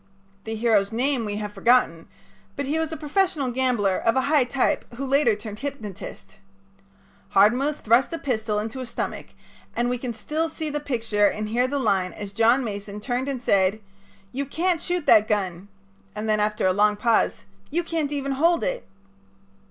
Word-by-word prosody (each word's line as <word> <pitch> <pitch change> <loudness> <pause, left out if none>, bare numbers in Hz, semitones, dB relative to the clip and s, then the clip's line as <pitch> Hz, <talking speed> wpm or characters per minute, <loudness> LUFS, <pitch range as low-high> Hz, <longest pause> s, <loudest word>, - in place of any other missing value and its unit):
The 225 0 -3
hero's 215 -3 +2
name 250 +1 0
we 205 -1 -3
have 210 0 -5
forgotten, 230 -10 +2 0.5
but 280 - -3
he 300 +4 -1
was 320 -1 -2
a 320 - -4
professional 305 -3 0
gambler, 240 -7 +1
of 230 - +1
a 265 - +3
high 285 -1 +3
type, 255 0 0
who 275 +3 -4
later 275 -4 +3
turned 210 0 -8
hypnotist. 215 -7 -7 1.0
Hardmuth 250 +9 +3
thrust 235 +4 +3
a 330 - -2
pistol 220 -7 -1
into 220 +5 -4
his 255 -2 -6
stomach, - - -4 0.5
and 240 +1 0
we 250 - -2
can 245 -1 -3
still 305 +9 -2
see 315 -1 -4
the 295 - -2
picture 225 -7 +1
and 210 +1 -3
hear 245 +3 +2
the 285 +2 -2
line 195 -8 +1
as 205 -1 -8
John 230 +5 +4
Mason 205 -2 -5
turned 250 +4 -2
and 270 -2 -3
said: 195 0 +2 0.5
"You 275 +2 -3
can't 335 +3 0
shoot 350 -3 -2
that 215 0 +6
gun 190 -3 -2 0.5
[and 210 +1 -4
then 215 -1 +2
after 210 -1 0
a 185 - +4
long 210 +2 +3
pause]: 230 +1 +1 0.2
You 345 +4 0
can't 320 -4 -2
even 275 -1 -2
hold 330 +5 +2
it." - - -3
240 Hz, 185 wpm, -24 LUFS, 210-280 Hz, 1.0 s, that